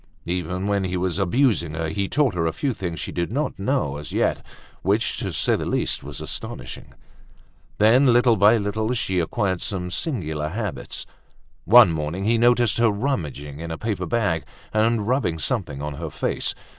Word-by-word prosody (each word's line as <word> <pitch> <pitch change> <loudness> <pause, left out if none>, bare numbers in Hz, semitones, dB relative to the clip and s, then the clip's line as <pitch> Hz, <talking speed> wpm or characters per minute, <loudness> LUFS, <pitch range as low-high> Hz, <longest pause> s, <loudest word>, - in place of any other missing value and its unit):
Even 90 +2 -2
when 100 -1 +1
he 90 0 -2
was 90 0 -1
abusing 95 - +2
her, 80 0 -2
he 100 +2 -1
taught 140 -6 +2
her 85 -2 0
a - - +1
few 135 - -2
things 85 -6 -5
she - - -5
did 85 +2 -2
not 140 -1 -2
know 100 - 0
as 75 - -8
yet, - - 0 0.4
which, 100 +4 +1
to - - -3
say - - +2
the - - -3
least - - -1
was 70 0 -7
astonishing. - - -7 0.8
Then, 125 +5 +5
little 120 -1 +5
by 105 +3 +5
little 110 +2 -1
she 95 -5 0
acquired 95 +2 -1
some 90 -3 -3
singular 80 - -2
habits. 105 +1 -4 0.6
One 110 -1 +8
morning 80 +4 -3
he 115 +2 +2
noticed 120 -2 +3
her 115 -1 +5
rummaging 80 - -3
in 85 0 -6
a 80 - -4
paper 110 +1 -3
bag 100 -9 0 0.3
and 110 0 +2
rubbing 120 -10 +1
something 80 - -2
on 75 0 -3
her 80 +2 -5
face. - - -2
100 Hz, 180 wpm, -23 LUFS, 85-115 Hz, 0.8 s, One